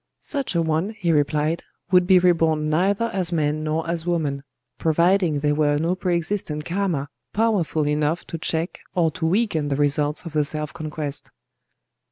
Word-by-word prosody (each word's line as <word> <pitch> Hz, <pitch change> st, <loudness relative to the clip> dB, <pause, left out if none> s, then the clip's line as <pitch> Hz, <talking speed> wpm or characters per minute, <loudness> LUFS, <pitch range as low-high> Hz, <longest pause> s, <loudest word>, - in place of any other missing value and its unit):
"Such 275 Hz, -, -1 dB
a 170 Hz, -, +3 dB
one," 160 Hz, +7 st, -1 dB
he 175 Hz, -6 st, 0 dB
replied, 150 Hz, +2 st, +1 dB, 0.3 s
"would 180 Hz, -1 st, +5 dB
be 190 Hz, -1 st, +7 dB
reborn 165 Hz, -4 st, +2 dB
neither 200 Hz, +8 st, +1 dB
as 185 Hz, -3 st, 0 dB
man 155 Hz, -2 st, 0 dB
nor 155 Hz, +1 st, -1 dB
as 170 Hz, -1 st, -2 dB
woman,—providing 155 Hz, +2 st, 0 dB
there 150 Hz, 0 st, +2 dB
were 145 Hz, -1 st, +2 dB
no 165 Hz, +4 st, +1 dB
pre 185 Hz, -1 st, -1 dB
existent 165 Hz, -3 st, -2 dB
karma 175 Hz, -6 st, -1 dB, 0.3 s
powerful 195 Hz, -9 st, +1 dB
enough 150 Hz, +3 st, 0 dB
to 165 Hz, -, -6 dB
check 160 Hz, +2 st, -2 dB, 0.2 s
or 165 Hz, -3 st, +2 dB
to 160 Hz, -2 st, -2 dB
weaken 175 Hz, -5 st, +1 dB
the 140 Hz, -, 0 dB
results 145 Hz, +2 st, +1 dB
of 165 Hz, -, -7 dB
the 150 Hz, -1 st, +2 dB
self 150 Hz, +1 st, -2 dB
conquest." 155 Hz, -3 st, -4 dB
160 Hz, 165 wpm, -23 LUFS, 150-180 Hz, 0.3 s, be